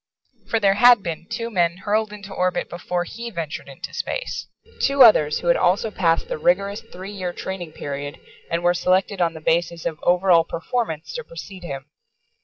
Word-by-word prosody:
For 225 - +1
there 200 -2 +4
had 240 0 +6
been 170 0 -5
two 230 0 -4
men 175 -3 +1
hurled 210 +2 0
into 200 -1 -9
orbit 180 0 -1
before 175 0 -2
he 235 +6 -7
ventured 165 -7 -5
into - - -8
space. - - -3 0.3
Two 275 -1 +6
others 150 -10 +6
who - - -4
had 170 - +5
also 195 +5 +2
passed 165 -5 +1
the - - -4
rigorous 200 +5 +1
three 195 -3 -9
year 185 -3 -4
training 175 -3 -6
period 145 +1 -5 0.3
and 170 +1 -1
were 175 0 +4
selected 185 +2 +1
on 165 -1 +1
the - - -7
basis 170 +1 0
of 155 -2 -2
over 180 +2 +3
all 165 -1 +7
performance 165 -1 -3
to 485 0 -4
precede 205 - -10
him. 140 -5 -6
180 Hz, 190 wpm, -22 LUFS, 170-205 Hz, 0.3 s, all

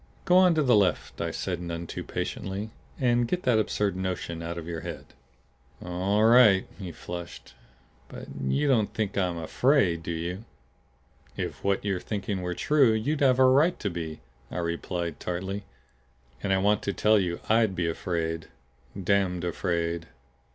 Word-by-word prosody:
"Go 180 - +4
on 180 -2 +6
to 155 - +3
the 125 -4 +5
left," 95 -5 +1
I - - -1
said 90 -3 -3
none 85 -1 -4
too - - -6
patiently. 100 +3 -4 0.3
"And 120 -2 +2
get 180 +7 -2
that 120 -3 +3
absurd 105 -2 0
notion 90 -3 -3
out 85 +1 -5
of 85 - -6
your 85 -1 -4
head." - - -7 0.7
"All 95 +4 0
right." 110 -4 +6
He 95 -3 -5
flushed. 85 +1 -8 0.5
"But - - -9 0.2
you 140 - +1
don't 115 -7 +2
think 105 -3 -1
I'm 90 -3 0
afraid, 90 - +2
do 85 - -7
you?" 85 +5 -4 0.9
"If - - -4
what 100 0 0
you're 95 -3 0
thinking 100 -1 -3
were 90 0 -3
true, 140 - +4
you'd 140 +8 -1
have 130 -2 +5
a 130 - +6
right 145 +7 +4
to 100 - -2
be," 80 -2 -5 0.3
I - - -6
replied 85 -1 -3
tartly. 95 +3 -4 0.8
"And 100 - -1
I 95 - +4
want 105 +2 +2
to 100 - -2
tell 105 +1 +4
you 85 -3 -1
I'D 110 -3 +3
be 85 -1 0
afraid. 80 -1 -2 0.5
Damned 95 -2 +1
afraid." 85 -1 -2
95 Hz, 165 wpm, -27 LUFS, 85-110 Hz, 0.9 s, on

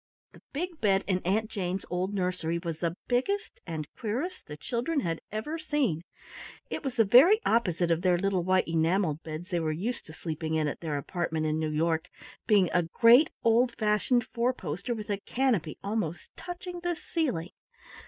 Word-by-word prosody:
The - - -17
big 335 +2 -4
bed 195 -2 +3
in 185 -2 +1
Aunt 205 +5 0
Jane's 185 -2 -3
old 180 +2 -1
nursery 180 -4 -1
was 170 -2 -4
the 170 0 -2
biggest 395 +13 -1
and 155 -3 -4
queerest 255 - -3
the 150 - -7
children 250 - -1
had 165 -5 -2
ever 260 +10 -3
seen. 280 - 0 0.7
It - - -3
was 270 -3 -3
the 230 - +5
very 295 - +7
opposite 180 -7 +2
of 165 0 +2
the 180 -1 +3
little 195 0 +1
white 185 +1 +2
enameled 165 0 +1
beds 160 +4 -7
they 175 - +1
were 160 -1 0
used 210 +10 -3
to 155 - -10
sleeping 160 -1 -3
in 155 -1 +1
at 145 - -4
their 155 -3 -2
apartment 160 +1 -2
in 155 0 0
New 155 -1 -1
York, 160 +1 0 0.4
being 205 -4 +5
a 180 - +4
great 230 - +6
old 230 +1 +3
fashioned 220 +3 +2
four 240 +2 0
poster 185 +4 -4
with 210 -1 -5
a 200 - -1
canopy 225 - 0
almost 200 -5 -3
touching 355 0 -7
the 350 0 -1
ceiling. 255 - -2
195 Hz, 185 wpm, -29 LUFS, 165-240 Hz, 0.7 s, very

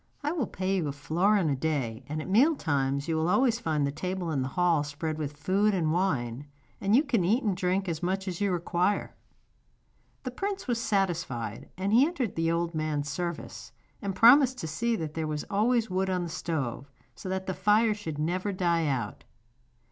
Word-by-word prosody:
I 295 - 0
will 305 - -1
pay 190 +1 -1
you 165 -5 -1
a - - -1
florin 175 +6 +1
a 145 - +1
day, 130 -5 -2
and 155 +1 -3
at - - -9
meal 255 - +4
times 140 - -1
you 165 - 0
will 160 +2 +1
always 235 +3 +3
find 155 -9 0
the 140 - -1
table 180 +2 -3
in 140 -4 0
the 130 - -1
hall 170 +1 +2
spread 155 +2 -4
with 145 -1 -4
food 195 +7 +2
and 160 -4 +1
wine, 145 -8 -1 0.3
and 200 +3 +3
you 280 - +5
can 240 - +1
eat 220 +9 +2
and 205 -4 +1
drink 185 +2 0
as 165 -3 -3
much 190 +2 -1
as 180 0 -4
you 200 -1 +2
require.' 180 +3 0 1.1
The 255 - -4
prince 390 +5 -4
was 235 -2 0
satisfied, 170 - -1
and 195 +3 -1
he 245 +4 +7
entered 270 - -2
the 165 0 +1
old 170 0 -1
man's 150 -2 -2
service, 170 +2 -5 0.3
and 200 -3 -3
promised 255 +2 +6
to 160 - -4
see 230 +10 0
that 160 -6 -4
there 160 -1 -2
was 150 -1 -3
always 225 +3 +2
wood 190 +1 0
on 180 -1 0
the 170 - -4
stove, 140 -5 -3 0.2
so 115 +11 -8
that 190 0 -2
the 185 - -2
fire 210 +4 +3
should 165 -8 -6
never 180 +6 -1
die 170 -4 +1
out. 135 -4 -2
180 Hz, 205 wpm, -28 LUFS, 155-205 Hz, 1.1 s, he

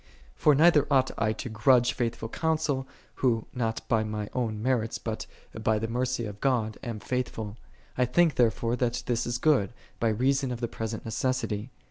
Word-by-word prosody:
For 150 - +4
neither 150 -1 +5
ought 130 -2 +3
I 110 -1 +1
to - - -6
grudge 120 +3 +4
faithful, 115 -1 -2
counsel, 155 -2 -1 0.3
who 115 -4 +1
not 115 -3 -2
by 110 -2 +2
my 105 -1 -4
own 115 -4 -1
merits, 115 -1 0
but - - -5 0.3
by 110 -1 +1
the 110 +1 -2
mercy 125 +1 -1
of 105 -1 -8
God, 115 -5 0
am 115 -3 -5
faith 125 +4 -1
ful. 105 -2 -6 0.2
" - - -30
I 125 - +5
think 160 +6 +3
therefore 115 0 +2
that 120 -1 -1
this 120 -1 0
is 120 - -1
good, 125 -7 +2 0.2
by 115 - +2
reason 130 +4 +1
of 120 - -4
the 120 - -1
present 110 -1 -5
necessity." 115 -1 -1
120 Hz, 185 wpm, -28 LUFS, 110-130 Hz, 0.3 s, neither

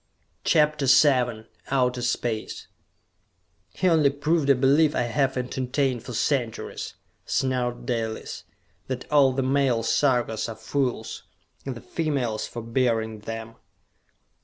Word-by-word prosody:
CHAPTER 150 -3 +2
VII 125 -5 +4 0.2
Outer 125 -2 +1
Space 120 -2 -2 1.0
"He 185 - -1
only 160 -5 +5
proved 145 +1 0
a 140 - +7
belief 140 +4 +3
I - - +1
have 135 +2 0
entertained 125 0 -1
for 125 - -8
centuries!" 120 -1 -2 0.3
snarled 125 -2 -1
Dalis. 115 -3 -3 0.4
"That 130 -1 -4
all 140 -3 +5
the 130 +1 -1
male 130 -3 +2
Sarkas 120 -2 +1
are 115 - -6
fools 120 +1 -2 0.5
and 130 - -3
the 120 - -9
females 125 -9 -2
for 120 - -7
bearing 115 -2 0
them!" 115 +1 -7
125 Hz, 120 wpm, -25 LUFS, 115-140 Hz, 1.0 s, a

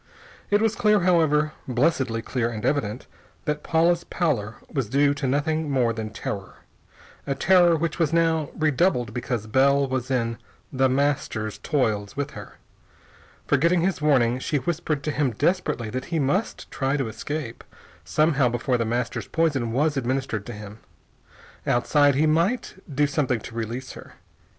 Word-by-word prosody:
It 205 +1 +3
was 225 -1 +2
clear, 210 -4 +3
however, 155 -4 +3 0.2
blessedly 125 -3 +1
clear 120 -3 -1
and 110 -3 -5
evident, 125 -5 -1 0.4
that 150 0 -1
Paula's 170 +1 +2
pallor 115 - -1
was 130 -7 -3
due 140 +3 +3
to 145 -1 -3
nothing 155 +3 0
more 125 -4 +2
than 110 -1 -4
terror 100 -3 -6 0.7
a 140 - 0
terror 175 +1 +5
which 165 +2 -2
was 160 -3 +2
now 165 -2 +2
redoubled 155 -4 +1
because 120 -3 -3
Bell 140 +4 +3
was 130 -1 -3
in 115 -3 -1 0.3
The 130 0 +3
Master's 130 -6 -1
toils 110 -9 -1
with 145 0 -2
her. - - -10 0.9
Forgetting 170 +4 +3
his 185 -2 0
warning, 130 -5 +3
she 145 - -1
whispered 155 0 -2
to 155 - -1
him 145 -5 0
desperately 145 - 0
that 130 +2 -4
he 170 - -2
must 155 +9 -1
try 135 +1 0
to 135 -4 -1
escape, 145 +2 -5 0.4
somehow, 150 -5 +2
before 120 +1 0
The 115 - 0
Master's 120 +2 -2
poison 145 -8 0
was 145 +4 +1
administered 130 -4 -2
to 120 - -6
him. 105 0 -10 0.9
Outside, 145 +3 +3
he 150 +3 +3
might 170 +10 +1 0.2
do 145 +1 +2
something 140 -5 0
to 115 - -9
release 115 +3 -4
her. - - -12
140 Hz, 155 wpm, -24 LUFS, 120-155 Hz, 0.9 s, terror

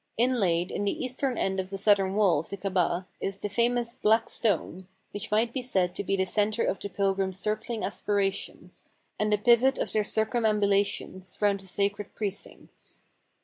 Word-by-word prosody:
Inlaid 195 -8 +2
in 205 - -2
the 200 - -1
eastern 255 -1 -2
end 190 0 0
of 185 0 -3
the 195 - -5
southern 195 -1 +3
wall 195 -8 +4
of 160 - -7
the 200 - -5
Kabah 185 -2 0
is 195 0 -3
the 205 - -4
famous 235 +2 +1
"Black 225 -1 +2
Stone," 190 -3 -1 0.2
which 205 +2 -5
might 225 +2 +1
be 260 - -2
said 190 -8 0
to - - -4
be 195 - 0
the 190 -1 +1
center 210 +4 0
of 190 - -1
the 200 - -5
pilgrims' 195 -1 -1
circling 215 +3 -3
aspirations, 200 -1 -3 0.3
and 215 0 +1
the 210 - +4
pivot 240 +5 +4
of - - -2
their 215 - +1
cir 220 +1 +1
cumambulations 205 -4 0
round 205 -1 +2
the 190 - -11
sacred 200 +2 -2
precincts. 205 -2 -7
205 Hz, 185 wpm, -28 LUFS, 195-220 Hz, 0.3 s, wall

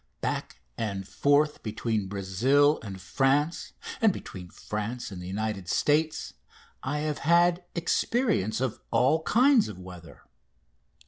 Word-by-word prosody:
Back - - -3 0.2
and 100 -3 -3
forth 145 +4 +2
between 110 -2 -2
Brazil 115 +10 +2
and 95 -3 -7
France 135 - 0 0.3
and 220 -2 +5
between 90 - -8
France 105 +5 -5
and 90 -2 -7
the 90 - -7
United 100 -1 -3
States 155 +6 +1 0.5
I 145 +3 -2
have 150 -1 -2
had 175 +3 +3
experience 170 - 0
of 130 -4 -2
all 145 +6 +3
kinds 250 - +4
of 105 - -8
weather. 90 -2 -12
125 Hz, 125 wpm, -27 LUFS, 100-155 Hz, 0.5 s, and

